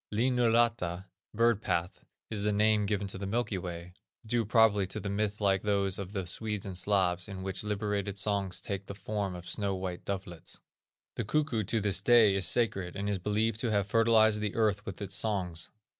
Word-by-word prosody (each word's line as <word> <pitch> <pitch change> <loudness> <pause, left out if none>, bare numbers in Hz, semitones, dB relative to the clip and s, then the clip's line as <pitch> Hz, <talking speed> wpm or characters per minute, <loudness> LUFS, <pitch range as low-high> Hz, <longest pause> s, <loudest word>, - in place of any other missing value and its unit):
Linnunrata 115 -6 +2 0.3
(bird 115 -1 +2
path) 85 -4 -2 0.3
is 105 -2 -1
the 105 +1 +1
name 105 0 +3
given 100 -1 -1
to 95 0 -3
the 100 - -4
Milky 110 -2 -1
way, 85 0 -7 0.3
due 115 0 0
probably 105 -3 +4
to 100 - -3
a - - -1
myth 105 +1 -1
like 95 -2 +2
those 100 -2 +1
of 95 -1 -6
the 95 -3 -3
Swedes 105 +3 -3
and 95 -2 -5
Slavs, 90 -2 +1
in 95 -2 -7
which 95 +1 -1
liberated 105 -1 -2
songs 100 -3 0
take 100 0 -5
the 100 - -7
form 100 -2 -3
of 90 0 -9
snow 100 0 -1
white 95 -1 -5
dovelets. 95 -4 -5 0.6
The - - -1
cuckoo 130 -1 0
to 110 +3 0
this 100 -2 +1
day 110 -1 +6
is 95 -2 +3
sacred, 95 -7 +1
and 100 +1 -3
is 100 -2 -1
believed 105 +3 0
to 120 - -1
have 100 -3 +1
fertilized 110 0 +4
the 105 -1 -2
earth 105 -2 +1
with 95 - -5
his 100 -1 -5
songs. 95 -5 -1
100 Hz, 195 wpm, -30 LUFS, 95-110 Hz, 0.6 s, day